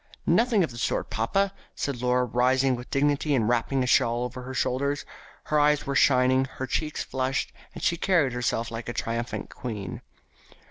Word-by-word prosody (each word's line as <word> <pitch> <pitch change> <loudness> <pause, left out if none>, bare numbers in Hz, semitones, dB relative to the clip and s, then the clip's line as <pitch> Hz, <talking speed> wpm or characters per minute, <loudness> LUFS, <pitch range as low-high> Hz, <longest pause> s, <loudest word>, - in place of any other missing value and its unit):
"Nothing 230 -5 +3
of 160 - -2
the 120 - -8
sort, - - -1
papa," 195 - 0 0.2
said 135 -4 -3
Laura, 125 0 +2
rising 130 +2 +2
with 125 +1 -9
dignity 145 +1 +1
and 115 -4 +1
wrapping 120 +3 +1
a - - 0
shawl 120 -1 +2
about 125 +1 -6
her 130 - -6
shoulders. 140 +3 0 0.4
Her 150 - +1
eyes 150 0 +3
were 140 - -2
shining, 130 -1 +4
her 130 - -2
cheeks 150 +4 -2
flushed, 130 0 -2 0.2
and - - -8
she 170 - +2
carried 165 -8 +2
herself 120 -1 -1
like 115 +1 -5
a - - -3
triumphant 115 +1 -3
queen. 105 -6 -6
130 Hz, 180 wpm, -26 LUFS, 120-145 Hz, 0.4 s, shining